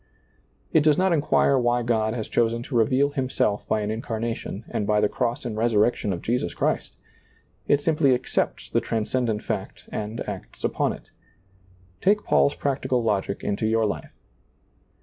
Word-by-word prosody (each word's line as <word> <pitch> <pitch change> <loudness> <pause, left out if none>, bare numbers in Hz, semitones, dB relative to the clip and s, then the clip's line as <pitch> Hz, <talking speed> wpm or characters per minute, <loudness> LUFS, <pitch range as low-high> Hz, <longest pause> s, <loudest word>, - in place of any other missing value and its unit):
It 160 - +6
does 150 -1 +4
not 185 -1 +3
inquire 145 -3 +3
why 120 0 +1
God 110 -1 +1
has 110 -3 -4
chosen 115 0 +1
to 125 - -6
reveal 130 +5 +3
Himself 130 -7 -1
by 110 - +1
an 105 +1 -2
incarnation, 115 -1 -4
and 105 - -2
by 105 0 +3
the 105 - +3
cross 120 +2 -2
and 115 -3 -3
resurrection 110 -1 +2
of 85 - -4
Jesus 115 -7 -1
Christ? - - -1 0.7
It 145 0 +3
simply 150 -5 +3
accepts 125 - -2
the - - +2
trans 110 -2 -2
cendent 115 -5 0
fact - - -4
and 110 +2 -4
acts - - -8
upon - - 0
it. - - -14 0.9
Take 210 +2 +3
Paul's 140 - +3
practical 130 -3 0
logic 100 -3 -1
into 105 +2 -1
your 110 0 +2
life. 105 - -4
115 Hz, 165 wpm, -25 LUFS, 110-130 Hz, 0.9 s, It